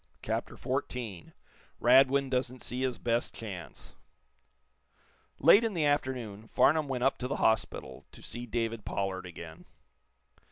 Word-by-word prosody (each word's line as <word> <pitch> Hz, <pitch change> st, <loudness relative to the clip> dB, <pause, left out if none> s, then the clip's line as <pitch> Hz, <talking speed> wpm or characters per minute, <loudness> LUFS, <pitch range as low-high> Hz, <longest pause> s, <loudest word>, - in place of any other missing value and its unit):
CHAPTER -, -, -3 dB
XIV 110 Hz, -9 st, -4 dB, 0.5 s
RADWIN 135 Hz, +2 st, +5 dB
DOESN'T 125 Hz, 0 st, -1 dB
SEE 125 Hz, +1 st, -3 dB
HIS 130 Hz, -2 st, -1 dB
BEST 120 Hz, 0 st, -1 dB
CHANCE 95 Hz, -6 st, -8 dB, 1.4 s
Late 180 Hz, -, +7 dB
in 225 Hz, -4 st, -1 dB
the 160 Hz, -3 st, +1 dB
afternoon 125 Hz, -7 st, -1 dB
Farnum 155 Hz, +4 st, +3 dB
went 130 Hz, -2 st, -2 dB
up 135 Hz, -, +2 dB
to 125 Hz, -, -2 dB
the 140 Hz, -, -2 dB
hospital 110 Hz, -1 st, 0 dB
to -, -, -14 dB
see 120 Hz, +1 st, -6 dB
David 115 Hz, -1 st, -2 dB
Pollard 95 Hz, -2 st, -3 dB
again. 85 Hz, -2 st, -10 dB
125 Hz, 130 wpm, -30 LUFS, 110-135 Hz, 1.4 s, Late